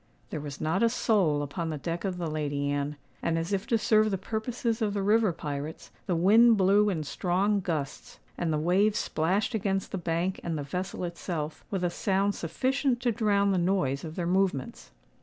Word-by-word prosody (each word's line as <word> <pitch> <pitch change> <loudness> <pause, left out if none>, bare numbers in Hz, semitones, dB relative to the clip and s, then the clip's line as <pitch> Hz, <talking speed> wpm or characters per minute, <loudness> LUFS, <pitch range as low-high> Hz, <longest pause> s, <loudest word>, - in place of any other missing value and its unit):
There 155 - -3
was 145 -1 -7
not 160 +5 0
a 230 - +5
soul 190 -11 +2
upon 160 +4 -4
the 155 - -3
deck 165 +4 -4
of 185 -2 -2
the 175 - -3
Lady 145 -2 -1
Anne; 145 +1 -2 0.3
and, 165 0 0
as 165 +4 -2
if 195 0 -1
to 230 - +3
serve 215 0 +3
the 195 - -1
purposes 225 +3 -2
of 210 -2 0
the 200 - 0
river 215 0 +3
pirates, 150 -1 -6 0.2
the 180 - +1
wind 220 +7 +6
blew 200 +2 +4
in 165 -6 -1
strong 185 +7 0
gusts, 155 -6 -4 0.2
and 170 -2 -1
the 155 - +1
waves 190 +7 +2
splashed 185 +9 0
against 195 -3 -1
the 190 - -2
bank 170 +2 -1
and 165 -2 -2
the 145 - -3
vessel 180 +6 -4
itself, 170 -3 -4
with 190 -3 -2
a 175 - +1
sound 195 +2 +1
sufficient 260 - 0
to 245 - +2
drown 205 -3 +2
the 185 - +2
noise 170 -7 0
of 160 -1 -7
their 175 - -2
movements. 180 -6 -1
180 Hz, 200 wpm, -28 LUFS, 160-205 Hz, 0.3 s, wind